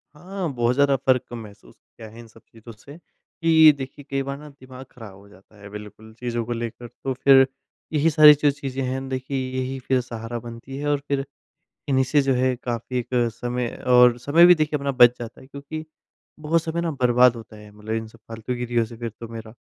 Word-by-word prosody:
हाँ। 185 +3 -5
बहुत 120 0 +1
ज़्यादा 140 0 +3
फ़र्क 130 -2 +1
तो 120 - -7
महसूस 105 -3 -12
किया 110 - -15
है 115 +2 -14
इन 120 - -12
सब 115 0 -20
चीज़ों 115 +1 -13
से 140 +8 -14
कि 160 -2 +3
देखिए 135 +1 -9
कई 135 0 -1
बार 140 0 -5
न 150 0 -11
दिमाग 130 -1 -13
खराब 110 -5 -12
हो 100 +1 -17
जाता 100 +1 -21
है 100 - -11
बिल्कुल 105 +1 -11
चीज़ों 120 -1 -3
को 120 - -3
लेकर। 120 +1 -6
तो 130 +3 -5
फिर 135 +1 +5 0.5
यही 155 +1 +3
सारी 150 -1 +8
जो 145 - +4
चीज़ें 135 -2 -6
हैं 130 +1 -3
देखिए 130 +1 -4 0.2
यही 130 +1 -3
फिर 130 0 0
सहारा 120 0 -7
बनती 120 +3 -9
हैं 145 +1 -4
और 145 -1 +1
फिर 140 -1 -1 0.6
इन्हीं 130 -1 +3
से 145 +3 +2
जो 135 -1 +1
है 130 0 +1
काफ़ी 120 +1 -4
एक 120 - -6 0.3
समय 120 +1 -3 0.2
और 125 -1 +6
समय 160 +7 +5
भी 180 0 +7
देखिए 155 -1 -1
अपना 140 0 -2
बच 125 -2 +5
जाता 120 -1 -9
है 130 - -16
क्योंकि 140 +3 -8 0.5
बहुत 160 +2 +1
समय 170 +1 -3
न 170 -1 -2
बर्बाद 125 0 +4
होता 115 -1 -11
है 105 0 -14
मतलब 105 +1 -7
इन 110 0 -3
सब 115 +1 -18
फालतू 115 +2 -5
गिरियों 120 -1 -1
से 115 - -12
फिर 115 -1 -5
तो 115 - -7
मेरा। 110 -1 -9
125 Hz, 220 wpm, -23 LUFS, 115-140 Hz, 0.6 s, सारी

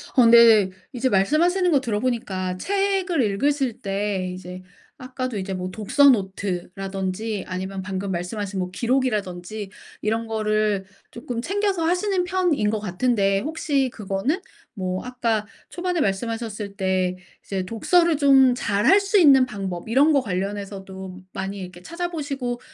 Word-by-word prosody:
근데 230 -5 +7 0.2
이제 255 +1 0
말씀하시는 340 - +2
것 285 - +4
들어보니까 210 -6 -2
책을 390 - 0
읽으실 255 +3 0
때 195 -2 -2
이제 180 0 -8 0.4
아까도 255 -3 -4
이제 190 0 -4
뭐 185 0 -4
독서 265 +8 +4
노트라든지 195 0 -2
아니면 190 +1 -4
방금 190 +1 -4
말씀하신 190 +2 -3
뭐 180 - -2
기록이라든지 210 -5 -2 0.3
이런 225 +2 -1
거를 215 -2 0 0.2
쪼끔 235 -1 -5
챙겨서 390 +2 0
하시는 360 +2 +1
편인 355 - +1
것 215 0 -1
같은데 195 0 +1
혹시 285 0 0
그거는 210 - -2 0.3
뭐 185 -2 -3
아까 230 -4 -1 0.2
초반에 360 -2 -2
말씀하셨을 210 0 -3
때 185 -1 0 0.3
이제 190 -2 -3
독서를 330 - +2
좀 270 -3 +6
잘 205 -4 -1
할 395 +2 +7
수 400 +1 +1
있는 275 -6 +7
방법 195 -4 -5
이런 280 +7 +4
것 280 - +4
관련해서도 190 -2 -5
많이 195 +1 -4
이렇게 180 -1 -9
찾아 345 - -4
보시고 275 -7 -4
220 Hz, 310 characters per minute, -23 LUFS, 195-275 Hz, 0.4 s, 근데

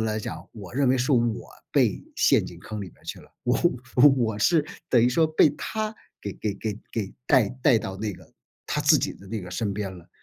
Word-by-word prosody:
来 110 -1 0
讲， 110 - -7
我 105 0 -10
认 140 -1 +2
为 130 +1 +3
是 125 +4 +1
我 120 -3 +1 0.2
被 - - +2
陷 - - +4
进 - - -9
坑 110 -1 -7
里 100 - -5
面 - - -25
去 - - -6
了。 - - -18
我 125 - +2 0.6
我 110 -4 0
是 155 +6 +3 0.2
等 120 - +5
于 120 - +5
说 160 +6 +3
被 155 0 +5
她 215 +6 -4 0.3
给 100 - -5
给 105 +1 -3
给 105 +1 -4
给 105 -4 -4
带 130 -7 +5
带 125 -6 +5
到 95 -2 -5
那 105 0 -2
个 90 - -15 0.3
她 - - -1
自 - - +6
己 - - -1
的 100 - -15
那 105 0 -4
个 90 - -8
身 100 +1 -2
边 100 -2 -4
了。 90 -2 -14
110 Hz, 240 characters per minute, -25 LUFS, 100-130 Hz, 0.6 s, 自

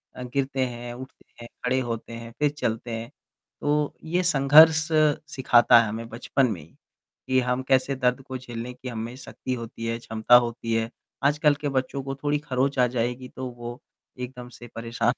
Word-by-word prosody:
अ, 125 - -6
गिरते 135 -1 0
हैं, 120 0 -6
उठते 130 +1 -11 0.2
हैं, 120 - -8 0.2
खड़े 130 +1 +2
होते 115 -2 -4
हैं, 115 0 -8
फिर 150 -1 +3
चलते 120 -5 -3
हैं। 115 +1 -5 0.5
तो 150 0 0
ये 175 +3 0
संघर्ष 155 +1 +6 0.5
सिखाता 120 -3 +6
है 110 - -1
हमें 115 +2 -5
बचपन 130 +3 0
में 90 -7 -5
ही 80 - -18 0.5
कि 130 0 +3
हम 125 +1 0
कैसे 130 +1 +2
दर्द 125 0 +1
को 130 -1 -6
झेलने 120 -1 -7
की 125 +1 -10
हममें 115 +1 -5
शक्ति 130 0 -6
होती 115 -1 -6
है, 115 0 -1
क्षमता 110 +1 +3
होती 120 -1 +2
है। 115 0 0 0.3
आजकल 150 +1 +3
के 145 - -1
बच्चों 135 0 -2
को 135 0 -4
थोड़ी 145 0 +1
खरोंच 135 -1 -1
आ 125 - +5
जाएगी 125 +1 -2
तो 130 0 -6
वो 120 0 -8 0.4
एकदम 125 -1 -7
से 120 0 -12
परेशान 115 +1 0
125 Hz, 185 wpm, -25 LUFS, 115-135 Hz, 0.5 s, संघर्ष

